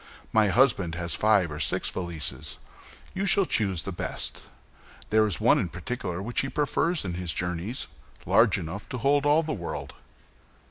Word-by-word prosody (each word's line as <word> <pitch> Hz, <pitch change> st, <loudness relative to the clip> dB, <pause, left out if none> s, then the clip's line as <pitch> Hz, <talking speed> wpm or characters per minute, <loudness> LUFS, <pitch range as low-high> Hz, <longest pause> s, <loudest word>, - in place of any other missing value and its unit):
"My 110 Hz, -1 st, +5 dB
husband 100 Hz, -7 st, +3 dB
has 85 Hz, 0 st, -3 dB
five 100 Hz, -6 st, +3 dB
or 75 Hz, -, -6 dB
six -, -, 0 dB
valises; 80 Hz, -7 st, -4 dB, 0.6 s
you 195 Hz, +1 st, -1 dB
shall 195 Hz, -1 st, +5 dB
choose 95 Hz, -, +1 dB
the 95 Hz, -, -4 dB
best. 85 Hz, -, -4 dB, 0.7 s
There 110 Hz, 0 st, +4 dB
is 100 Hz, -, -2 dB
one -, -, +4 dB
in 90 Hz, -, -1 dB
particular 95 Hz, -4 st, -4 dB
which 120 Hz, +3 st, -1 dB
he 135 Hz, -, -3 dB
prefers 150 Hz, -, 0 dB
in 90 Hz, -, -3 dB
his 85 Hz, -3 st, -2 dB
journeys, 90 Hz, +7 st, -3 dB, 0.4 s
large -, -, +4 dB
enough 85 Hz, +5 st, -6 dB
to 125 Hz, -, -4 dB
hold 140 Hz, +4 st, +2 dB
all 150 Hz, +3 st, +4 dB
the 155 Hz, 0 st, -3 dB
world." 85 Hz, -8 st, -5 dB
100 Hz, 170 wpm, -27 LUFS, 85-130 Hz, 0.7 s, My